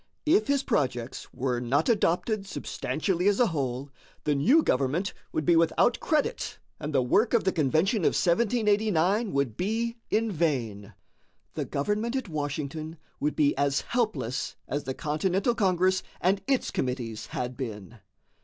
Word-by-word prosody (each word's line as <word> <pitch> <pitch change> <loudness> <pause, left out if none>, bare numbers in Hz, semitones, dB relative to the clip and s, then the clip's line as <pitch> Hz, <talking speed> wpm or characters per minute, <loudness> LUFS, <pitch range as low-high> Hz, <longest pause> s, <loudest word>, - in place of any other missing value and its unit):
If 360 +6 +4
his 280 -1 +2
projects 125 - -2
were 125 -1 -1
not 125 +4 +1
adopted 210 -1 +1
substantially 180 0 -2
as 205 -1 +3
a 245 - +6
whole, 135 -1 -3 0.3
the 150 - +2
new 250 - +4
government 140 +9 0 0.2
would 155 - -2
be 170 - +5
without 165 +8 +3
credit 320 +10 -1 0.2
and 150 - -4
the 135 -3 +2
work 215 - +3
of 230 - +3
the 190 - +2
Convention 160 - +2
of 170 - +2
1789 210 0 +2
would 140 -6 0
be 230 - -1
in 225 0 +1
vain. 125 - -2 0.6
The - - -3
government 210 - -1
at 260 -4 -2
Washington 155 +1 -4 0.2
would 150 +1 -1
be 145 -1 +3
as 140 -1 +1
helpless 215 - -2
as 145 +1 -3
the 130 - -3
Continental 185 +9 0
Congress 185 -3 +2 0.2
and 195 +2 +2
its 270 -2 +1
committees 120 -4 -3
had 125 0 -4
been. 110 -3 -7
165 Hz, 150 wpm, -27 LUFS, 140-215 Hz, 0.6 s, a